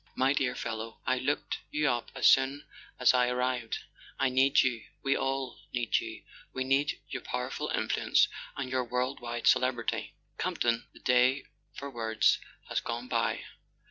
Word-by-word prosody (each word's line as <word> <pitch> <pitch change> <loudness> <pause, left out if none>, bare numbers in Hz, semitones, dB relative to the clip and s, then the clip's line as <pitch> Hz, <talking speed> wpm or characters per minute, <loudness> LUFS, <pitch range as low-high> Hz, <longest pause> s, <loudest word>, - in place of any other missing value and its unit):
"My 130 +2 +3
dear 130 -3 0
fellow, 110 0 -5
I 130 0 +1
looked 140 +3 -1
you 150 0 +1
up 120 -2 0
as - - -1
soon 135 +2 +5 0.3
as - - +6
I 125 -1 +3
ar¬ 125 - -1
rived. 125 -2 -1 0.4
I 135 - +2
need 135 +2 +4
you—we 130 +2 -1
all 135 -1 -2
need 120 -2 +1
you—we 130 - -7
need 140 +5 +1
your 130 - -4
pow¬ 125 +1 -3
erful - - -3
influence - - +3 0.3
and 135 -2 -3
your 130 -1 +1
world 125 +3 -1
wide 120 -1 -5
celebrity. 125 -2 +2 0.2
Camp - - -1
ton, 120 -1 +1
the - - -16
day 125 +2 +4 0.3
for 140 0 -6
words 110 -2 +2 0.3
has - - -1
gone 120 +1 -4
by. - - 0
125 Hz, 165 wpm, -30 LUFS, 120-135 Hz, 0.4 s, as